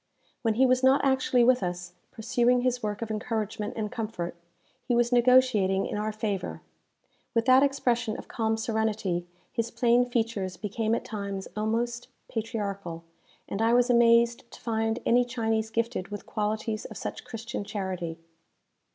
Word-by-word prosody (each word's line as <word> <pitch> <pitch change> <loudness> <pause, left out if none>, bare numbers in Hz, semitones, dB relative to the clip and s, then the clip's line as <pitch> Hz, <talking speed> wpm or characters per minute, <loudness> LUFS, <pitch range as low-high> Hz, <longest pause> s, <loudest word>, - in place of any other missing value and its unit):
When 225 -3 +1
he 260 +3 +5
was 255 0 +3
not 265 +2 +4
actually 260 -2 +3
with 250 0 +4
us, 175 -1 -4 0.2
pursuing 240 +2 +2
his 250 0 0
work 210 +1 -3
of 225 - -5
encouragement 215 -1 -3
and 215 -1 -2
comfort, 220 -7 -4 0.5
he 245 - +2
was 240 0 +2
negotiating 240 -6 +4
in - - -4
our 210 +1 -1
favour. 195 - -3 0.7
With 230 0 +2
that 260 +1 +7
expression 245 -5 +1
of - - -9
calm 220 -1 -1
serenity, 220 -6 -1 0.2
his 230 -1 -2
plain 245 +1 +3
features 220 -6 -1
became 215 +3 -1
at - - -4
times 200 -3 -5
almost 230 +3 -1 0.2
patriarchal; 200 -7 -4 0.4
and 200 - -3
I 225 +1 +3
was 245 0 +4
amazed 235 0 +4
to - - -13
find 225 -1 -1
any 245 +1 +4
Chinese 225 -3 -1
gifted 230 -4 -2
with 205 0 -7
qualities 215 +1 -2
of - - -8
such - - -5
Christian 230 -1 -5
charity. 185 -5 -4
225 Hz, 155 wpm, -28 LUFS, 210-240 Hz, 0.7 s, that